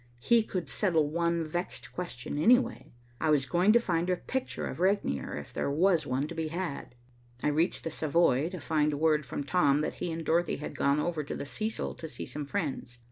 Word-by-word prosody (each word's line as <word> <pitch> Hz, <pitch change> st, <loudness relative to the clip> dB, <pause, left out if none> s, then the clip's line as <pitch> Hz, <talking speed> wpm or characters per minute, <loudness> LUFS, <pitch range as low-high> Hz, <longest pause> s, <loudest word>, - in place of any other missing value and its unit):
He 235 Hz, -, +4 dB
could 185 Hz, -5 st, -4 dB
settle 165 Hz, -7 st, +1 dB
one 170 Hz, 0 st, +1 dB
vexed 175 Hz, +4 st, -5 dB
question 145 Hz, -5 st, -5 dB
anyway. 245 Hz, +7 st, +3 dB, 0.3 s
I 160 Hz, -, +1 dB
was 145 Hz, -3 st, +3 dB
going 180 Hz, +8 st, +3 dB
to 235 Hz, -, +7 dB
find 175 Hz, -5 st, 0 dB
a 180 Hz, -, +3 dB
picture 260 Hz, +7 st, -3 dB
of -, -, -5 dB
Regnier 185 Hz, -, 0 dB
if -, -, -8 dB
there -, -, -1 dB
was 160 Hz, +1 st, +2 dB
one 130 Hz, +3 st, 0 dB
to 170 Hz, -, -7 dB
be 160 Hz, -1 st, -2 dB
had. 160 Hz, -6 st, -4 dB, 0.5 s
I -, -, +3 dB
reached 160 Hz, +4 st, +1 dB
the 165 Hz, -, -3 dB
Savoy 155 Hz, -2 st, +2 dB
to 185 Hz, -1 st, -6 dB
find 150 Hz, -1 st, +1 dB
word 155 Hz, -3 st, +2 dB
from 145 Hz, -, -3 dB
Tom 145 Hz, -2 st, +3 dB
that 155 Hz, -, -2 dB
he 175 Hz, -, -1 dB
and 165 Hz, 0 st, -4 dB
Dorothy 170 Hz, +2 st, +2 dB
had 150 Hz, -, -6 dB
gone 140 Hz, +1 st, +2 dB
over 160 Hz, -1 st, -1 dB
to -, -, -5 dB
the -, -, -5 dB
Cecil 215 Hz, +9 st, -3 dB
to 160 Hz, -, -8 dB
see -, -, -7 dB
some 150 Hz, -1 st, -5 dB
friends. 140 Hz, -9 st, -3 dB
160 Hz, 210 wpm, -30 LUFS, 150-180 Hz, 0.5 s, to